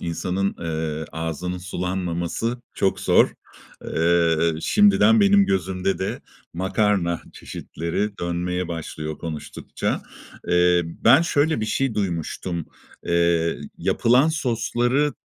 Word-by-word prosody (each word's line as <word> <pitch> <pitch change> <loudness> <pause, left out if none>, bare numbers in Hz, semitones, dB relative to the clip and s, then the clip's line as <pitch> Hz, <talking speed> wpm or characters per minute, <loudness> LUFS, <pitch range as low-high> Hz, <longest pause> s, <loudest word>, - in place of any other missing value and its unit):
insanın, 90 +3 -2
eee, 80 -2 -3
ağzının 80 +3 -4
sulanmaması 90 +5 -3
çok 95 - 0
zor. - - +4 0.5
Eee, 85 0 +2
şimdiden 205 - +5
benim 200 -1 +5
gözümde 95 +1 -1
de 95 - -3 0.3
makarna 95 -1 0
çeşitleri 100 +6 -4
dönmeye 90 +1 -2
başlıyor 80 -2 -5
konuştukça. 80 -3 -4 0.5
Eee, 90 0 +4
ben 110 - +4
şöyle 155 -5 +1
bir 110 - -1
şey 135 +1 0
duymuştum, 85 -3 -3 0.4
eee, 85 -1 +2 0.2
yapılan 125 +6 +3
sosları 130 -1 0
90 Hz, 100 wpm, -23 LUFS, 85-110 Hz, 0.5 s, şimdiden